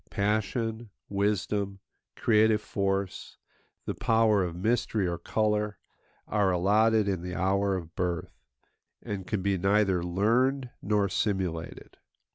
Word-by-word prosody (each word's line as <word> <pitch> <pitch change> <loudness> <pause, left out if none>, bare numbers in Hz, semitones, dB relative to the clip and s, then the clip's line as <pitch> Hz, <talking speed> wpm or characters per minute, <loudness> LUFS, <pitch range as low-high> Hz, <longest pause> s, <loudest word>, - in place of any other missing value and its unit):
Passion, 110 +2 -1 0.2
wisdom, 100 0 -1 0.4
creative 110 -1 +3
force, 100 -2 -3 0.5
the - - -2
power 110 -3 +3
of 85 -2 -4
mystery 105 0 0
or 85 -1 -3
colour, 105 -2 0 0.5
are 105 -2 +2
allotted 105 +4 +3
in 95 -3 -1
the 90 0 -5
hour 100 +2 +1
of 85 -3 -6
birth, 90 -2 -3 0.6
and 100 -2 -5
can 105 -4 -2
be 100 -1 +1
neither 100 -1 +2
learned 120 +9 +1
nor 105 -1 +1
simulated. 95 -4 -3
100 Hz, 115 wpm, -28 LUFS, 95-110 Hz, 0.6 s, creative